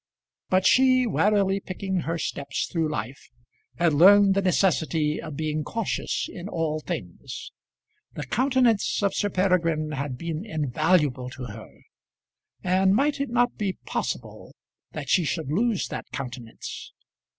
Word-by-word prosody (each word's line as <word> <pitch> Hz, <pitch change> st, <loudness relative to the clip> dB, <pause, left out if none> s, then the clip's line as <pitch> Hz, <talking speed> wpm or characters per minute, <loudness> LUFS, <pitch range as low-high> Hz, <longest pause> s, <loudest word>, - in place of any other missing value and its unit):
But 185 Hz, 0 st, +2 dB
she, 255 Hz, -1 st, +5 dB
warily 200 Hz, -3 st, +2 dB
picking 190 Hz, 0 st, -4 dB
her 165 Hz, 0 st, -2 dB
steps 140 Hz, -3 st, -3 dB
through 165 Hz, -3 st, -1 dB
life, 135 Hz, -2 st, -5 dB, 0.5 s
had 170 Hz, -2 st, +3 dB
learned 195 Hz, +5 st, +7 dB
the 195 Hz, -, +1 dB
necessity 165 Hz, -5 st, +1 dB
of 155 Hz, -3 st, -7 dB
being 155 Hz, 0 st, -2 dB
cautious 225 Hz, +7 st, -2 dB
in 180 Hz, +3 st, -8 dB
all 160 Hz, -3 st, -1 dB
things. -, -, -6 dB, 0.6 s
The -, -, -5 dB
countenance 250 Hz, -6 st, +2 dB
of 200 Hz, -, +2 dB
Sir 205 Hz, -, 0 dB
Peregrine 165 Hz, -5 st, +1 dB
had 140 Hz, -3 st, -3 dB
been 165 Hz, +3 st, -4 dB
invaluable 150 Hz, -, +1 dB
to 130 Hz, 0 st, -9 dB
her, 110 Hz, -1 st, -9 dB, 0.9 s
and 190 Hz, +1 st, +3 dB
might 280 Hz, +3 st, +1 dB
it 280 Hz, -, -2 dB
not 245 Hz, +1 st, +1 dB
be 200 Hz, -4 st, -1 dB
possible -, -, -4 dB, 0.4 s
that -, -, -5 dB
she 180 Hz, -, +3 dB
should 155 Hz, -1 st, -2 dB
lose 215 Hz, +4 st, +1 dB
that -, -, -6 dB
countenance? 125 Hz, -3 st, -7 dB
175 Hz, 140 wpm, -25 LUFS, 150-200 Hz, 0.9 s, learned